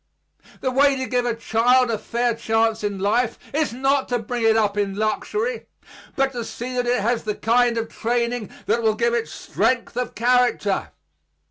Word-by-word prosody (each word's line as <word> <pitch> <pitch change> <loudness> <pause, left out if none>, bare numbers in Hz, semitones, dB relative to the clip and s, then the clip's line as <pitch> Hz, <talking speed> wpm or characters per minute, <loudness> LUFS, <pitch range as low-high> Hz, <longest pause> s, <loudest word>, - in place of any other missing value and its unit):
The 260 - 0
way 280 +2 +4
to 260 -1 -3
give 245 -1 0
a 235 - 0
child 235 +2 +2
a 220 - -1
fair 235 +2 0
chance 225 -1 0
in 205 -1 -2
life 220 +5 +1 0.2
is 305 -3 +1
not 270 +2 0
to 245 - +1
bring 240 +1 -4
it 225 0 +4
up 210 -2 +1
in 200 -1 -1
luxury, 420 - -2 0.5
but 270 0 +1
to 240 -3 -4
see 245 +3 -6
that 245 -1 0
it 245 -2 +2
has 235 +3 0
the 210 -1 -3
kind 235 +1 +2
of 225 0 -1
training 235 -1 -2 0.2
that 225 +5 +1
will 220 -1 +2
give 235 +1 +1
it 235 -1 0
strength 245 -2 -1
of 250 0 -3
character. 240 -4 +1
235 Hz, 190 wpm, -22 LUFS, 220-250 Hz, 0.5 s, way